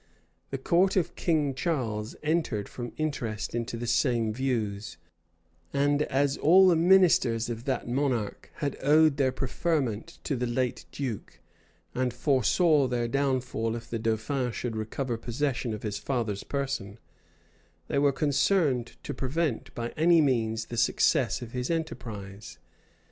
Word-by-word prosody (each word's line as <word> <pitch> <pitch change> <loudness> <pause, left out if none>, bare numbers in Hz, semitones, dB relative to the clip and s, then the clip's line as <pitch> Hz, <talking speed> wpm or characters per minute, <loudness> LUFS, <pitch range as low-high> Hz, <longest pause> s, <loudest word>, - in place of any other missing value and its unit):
The 135 - -3
court 175 +8 +2
of 175 -3 0
King 150 -5 +1
Charles 120 -8 -2
entered 150 -10 0
from 120 -1 -7
interest 120 -9 -3
into 115 0 -3
the 120 - -4
same 115 -3 +1
views; 110 -7 -2 0.8
and 145 +1 +2
as 140 -1 +1
all 185 +5 +6
the 175 - +4
ministers 160 -10 +4
of 115 +1 -6
that 130 -4 -2
monarch 125 -4 -1
had 145 -4 -3
owed 150 +1 +5
their 135 -2 +2
preferment 130 - -2
to 140 - -1
the 125 0 -1
late 125 +1 -1
duke, 125 -7 -5 0.5
and 125 0 0
foresaw 140 - +3
their 120 -1 -1
downfall 125 -4 -1
if 115 0 -7
the 115 - -2
dauphin 115 +4 -1
should 115 +1 -4
recover 115 +3 -3
possession 125 +1 -2
of 105 -1 -5
his 105 -2 -3
father's 115 -7 -2
person, 135 -8 -3 0.9
they 140 - 0
were 140 0 +4
concerned 140 -3 +1
to - - -4
prevent 140 -1 -2
by 120 0 -3
any 165 +4 +4
means 115 -6 +1
the 120 - -7
success - - +2
of 115 - -9
his 125 0 -3
enterprise. 110 - -5
130 Hz, 145 wpm, -28 LUFS, 115-145 Hz, 0.9 s, all